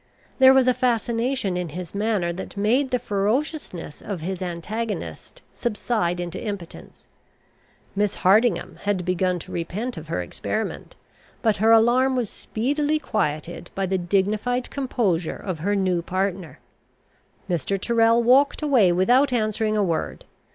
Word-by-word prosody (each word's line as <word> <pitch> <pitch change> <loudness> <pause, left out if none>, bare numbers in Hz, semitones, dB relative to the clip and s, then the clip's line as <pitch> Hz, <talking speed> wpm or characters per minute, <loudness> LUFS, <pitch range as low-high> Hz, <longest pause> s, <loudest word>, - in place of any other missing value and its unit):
There 260 0 +9
was 265 -1 +4
a 255 - +5
fascination 240 -3 0
in 180 -2 -3
his 175 +2 -7
manner 200 -4 0
that 190 +3 -8
made 245 +7 +2
the 250 - +1
ferociousness 215 - -2
of 195 -6 -5
his 185 +2 -4
antagonist 205 +6 -5
subside 210 -6 -1
into 175 -1 -5
impotence. 200 -6 -8 0.9
Miss 205 0 0
Hardingham 195 0 +2
had 200 -3 -1
begun 180 0 +1
to 170 - -10
repent 190 +8 -4
of 160 0 -8
her 160 - -2
experiment, 85 - -4 0.5
but 220 -2 +2
her 220 +3 +4
alarm 245 +4 +4
was 240 -5 -1
speedily 290 +7 -1
quieted 175 - -3
by 195 - 0
the 190 0 0
dignified 210 +7 0
composure 215 - -1
of 185 -5 -5
her 200 +6 0
new 185 -3 +1
partner. 185 -1 -3 0.9
Mr. 180 +3 -1
Tyrrel 230 +2 +3
walked 275 +5 +4
away 250 -11 +4
without 245 +11 +3
answering 215 -2 0
a 210 - +3
word. 170 -4 -2
205 Hz, 140 wpm, -23 LUFS, 180-240 Hz, 0.9 s, There